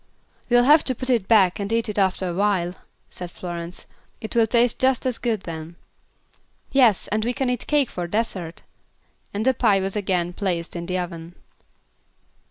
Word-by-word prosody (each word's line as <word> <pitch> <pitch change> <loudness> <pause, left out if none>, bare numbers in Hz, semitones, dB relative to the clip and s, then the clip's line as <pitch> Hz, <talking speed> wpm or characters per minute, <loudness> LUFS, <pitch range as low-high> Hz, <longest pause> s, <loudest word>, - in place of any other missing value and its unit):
"We'll 245 0 +5
have 295 +4 +6
to 260 - +1
put 255 +2 -2
it 225 -6 +1
back 195 -5 +4
and 200 +1 -3
eat 230 0 +1
it 210 -1 -2
after 190 -1 +1
awhile," 180 -1 0 0.3
said 180 -1 -7
Florence. 175 -1 -7 0.3
"It 220 - -7
will 230 -1 +4
taste 235 +1 +2
just 260 0 +2
as 250 -3 -1
good 230 -4 -1
then." 165 -1 -7 1.0
"Yes, 245 -8 +4
and 215 +1 0
we 240 +2 -1
can 255 0 -1
eat 245 - -4
cake 290 -4 +2
for 175 -1 -4
dessert," 185 -4 -3 0.7
and 210 +2 -3
the 260 - +4
pie 215 -5 +3
was 195 +1 -2
again 185 -4 -1
placed 175 -4 -3
in 170 0 -5
the 185 0 -1
oven. 170 -1 -6
205 Hz, 180 wpm, -23 LUFS, 175-235 Hz, 1.0 s, have